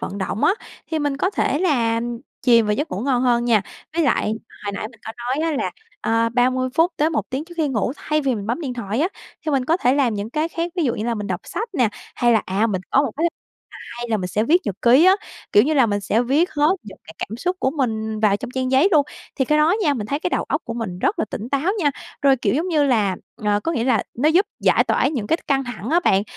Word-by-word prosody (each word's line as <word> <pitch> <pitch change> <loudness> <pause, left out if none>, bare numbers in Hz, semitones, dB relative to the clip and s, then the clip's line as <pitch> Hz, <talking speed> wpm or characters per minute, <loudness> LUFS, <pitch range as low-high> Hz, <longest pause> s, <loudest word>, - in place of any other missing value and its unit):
vận 200 - -5
động 195 +2 -2
á, - - +5 0.4
thì 320 - 0
mình 290 -2 -1
có 370 +7 0
thể 295 -7 0
là 240 -10 +1 0.4
chìm 235 -3 +5
vào 210 - +2
giấc 290 +7 -3
ngủ 185 - -3
ngon 250 0 +1
hơn 240 -2 +2
nha. 225 -4 +3 0.3
Với 335 - +2
lại 220 -6 +1 0.3
hồi 200 - -2
nãy 200 - -4
mình 225 -2 -20
có 225 - -4
nói 260 +7 -1
á 300 - -1
là, - - -1 0.3
ờ, 230 0 +1
30 255 +2 +1
phút 330 +3 +3
tới 305 +2 +2
1 310 - 0
tiếng 270 +4 -3
trước 345 +1 -13
khi 315 -3 +1
ngủ, 245 -2 0
thay 305 0 -1
vì 270 -3 0
mình 205 -2 -5
bấm 235 +8 -1
điện 265 -6 -4
thoại 225 0 -3
á, 335 - +2 0.4
thì 310 - -1
mình 270 -3 +1
có 320 +6 +2
thể 255 -7 +2
làm 265 -6 +2
những 205 +2 -4
cái 310 +4 -1
khác, 335 +1 -3
ví 345 - +1
dụ 245 - +1
như 215 - -4
là 235 0 0
mình 210 -2 -4
đọc - - -3
sách 460 - -4
nè, 250 -8 +3 0.3
hay 240 -1 +3
là 220 - +3
à 195 +4 +1
mình 195 -5 -1
có 275 - +4
một 275 - -1
cái 325 +3 +2 0.7
hay 240 0 -4
là 225 - +1
mình 185 -3 -3
sẽ 210 +4 0
viết 335 +9 +4
nhật 205 - -2
ký 255 +7 +6
á, 375 - +7 0.4
kiểu 205 - +7
như 305 +6 +1
là, 265 -5 +5
mình 205 -2 -1
sẽ 210 +4 +1
viết 285 +8 +2
hết 300 +4 +3
những 200 -2 -12
cái 160 - -12
cảm 220 - -4
xúc 360 +8 -1
của 265 - +2
mình 220 -5 -1
vào 210 -2 +3
trong 245 +4 -7
trang 255 0 -2
giấy 270 +8 +5
luôn. 300 -3 +5 0.3
Thì 265 - +2
cái 300 +4 +2
đó 310 +4 +4
nha, 295 -6 +2
mình 215 -5 -4
thấy 280 +5 -1
cái 355 - -2
đầu - - 0
óc - - -1
của 230 - -5
mình 220 -7 -4
rất 370 - 0
là - - +1
tỉnh 220 - -5
táo 280 +8 +1
nha, 300 -7 +2 0.3
rồi, 275 -1 +5
kiểu, 245 - 0
giống 325 +6 0
như 310 -4 +2
là, 215 -8 +2 0.2
ờ, 210 -1 0
có 330 - -2
nghĩa 235 -7 -1
là, 240 -5 +2
nó 280 +6 +2
giúp 360 +6 +4
giải - - +4
tỏa - - +2
những 250 -9 -3
cái 325 - +2
th - - -19
căng 270 -1 +1
thẳng 245 -2 -6
á 340 +2 +4
bạn. 195 +1 +4
255 Hz, 285 wpm, -21 LUFS, 220-305 Hz, 0.7 s, á